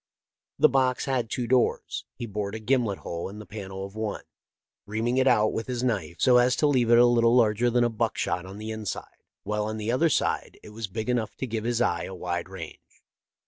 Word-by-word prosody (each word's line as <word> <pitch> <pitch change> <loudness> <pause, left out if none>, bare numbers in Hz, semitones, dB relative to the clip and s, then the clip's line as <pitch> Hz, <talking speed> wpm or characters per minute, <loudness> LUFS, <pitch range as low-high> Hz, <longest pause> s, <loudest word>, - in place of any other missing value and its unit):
The - - +6
box 130 -2 +1
had 130 -5 -1
two 125 - -2
doors. 125 +1 +1
He 120 - -5
bored 105 -1 -4
a - - -4
gimlet 115 -3 +1
hole 85 +2 -5
in 100 - -10
the 105 - -9
panel 95 -2 -7
of 100 +1 -11
one, 110 -1 -3 0.6
reaming 115 +4 -1
it 130 0 +3
out 110 -4 +4
with 115 - -3
his 125 -1 -2
knife, 95 -10 -1
so 125 +7 +5
as 125 0 +4
to 150 - +1
leave 130 -5 +3
it 120 - +7
a 120 - +7
little 120 0 +4
larger 115 0 +3
than 120 0 +3
a - - +4
buckshot 110 -5 -1
on 95 +2 -9
the 110 +1 -5
inside, 110 -2 -6 0.2
while 105 0 -1
on 110 +1 -3
the 110 +1 -2
other 160 +7 +3
side - - -1
it - - -11
was 110 +1 -5
big 110 +4 -5
enough 120 -3 -1
to - - -4
give 110 -2 -4
his 120 0 0
eye 85 -7 0
a 95 - -7
wide 85 -1 -3
range. - - -11
115 Hz, 225 wpm, -26 LUFS, 105-125 Hz, 0.6 s, it